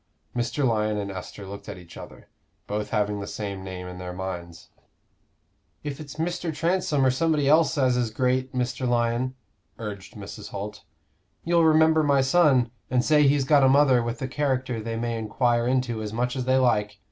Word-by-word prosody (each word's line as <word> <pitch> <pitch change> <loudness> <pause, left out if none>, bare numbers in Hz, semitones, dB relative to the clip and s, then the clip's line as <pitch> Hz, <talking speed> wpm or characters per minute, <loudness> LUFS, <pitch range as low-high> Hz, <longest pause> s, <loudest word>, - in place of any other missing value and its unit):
Mr. 120 +3 0
Lyon 110 -2 0
and 100 -1 -3
Esther 95 +2 -8
looked 100 +2 -9
at 100 - -6
each 90 -2 -14
other, - - -11 0.4
both 105 0 -3
having 105 -1 0
the 100 - -5
same 100 -2 -5
name 95 -1 -6
in 90 0 -8
their 90 -1 -6
minds. 90 -2 -7 1.1
"If 145 -1 -5
it's 145 -2 -9
Mr. 170 +1 -2
Transome 160 -3 +1
or 130 - +4
somebody 150 +1 +1
else 155 +1 +4
as 130 -3 +3
is 120 -2 0
great, 130 +3 0
Mr. 125 0 -2
Lyon," 120 +2 0 0.4
urged 100 -3 -7
Mrs. 100 -2 -8
Holt, 105 +1 -6 0.6
"you'll 170 -1 +3
remember 160 0 +5
my 140 -2 +3
son, 135 -4 +3 0.2
and 125 0 +1
say 150 -2 +5
he's 140 -1 +2
got 145 0 +5
a 135 - +5
mother 135 -2 +5
with 120 +2 -4
a - - -1
character 130 -4 -1
they 115 +1 -4
may 115 0 -2
enquire 120 +2 +1
into 125 -3 0
as 105 -1 -4
much 125 +3 -1
as 130 -2 -2
they 130 +1 +3
like. 105 -5 +1
125 Hz, 185 wpm, -25 LUFS, 105-140 Hz, 1.1 s, remember